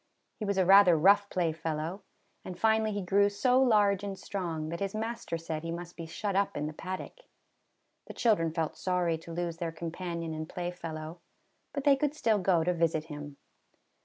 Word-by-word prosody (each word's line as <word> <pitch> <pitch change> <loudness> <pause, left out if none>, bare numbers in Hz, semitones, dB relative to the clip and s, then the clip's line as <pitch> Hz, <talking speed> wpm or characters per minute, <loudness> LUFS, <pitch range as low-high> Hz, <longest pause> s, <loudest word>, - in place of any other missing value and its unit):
He 215 - -3
was 200 -1 -1
a 190 - +3
rather 190 -2 +7
rough 200 +5 +5
playfellow; 165 +1 -2 0.4
and 180 - -7
finally 220 0 +2
he 205 -1 -3
grew 200 +3 +3
so 250 +5 +3
large 205 -5 +3
and 200 -1 -4
strong, 165 -7 -4
that 170 +1 -4
his 195 +1 -3
master 225 -5 -3
said 160 -1 -4
he 165 - -5
must 175 +1 -7
be 165 -1 -7
shut 200 +4 -3
up 200 -4 +1
in 145 - -2
the 155 - -4
paddock. 185 - -6 0.9
The - - -9
children 185 -9 +2
felt 160 -1 -2
sorry 175 -3 0
to 165 - -11
lose 170 0 -3
their 170 -1 -3
com 165 0 -5
panion 170 -2 -4
and 155 0 -5
playfellow, 170 -2 -5 0.5
but 280 - -4
they 280 -1 +6
could 290 +2 -1
still 225 -8 +2
go 180 -3 +2
to 180 +2 +1
visit 165 -2 +1
him. 145 -1 -8
180 Hz, 190 wpm, -30 LUFS, 165-200 Hz, 0.9 s, rather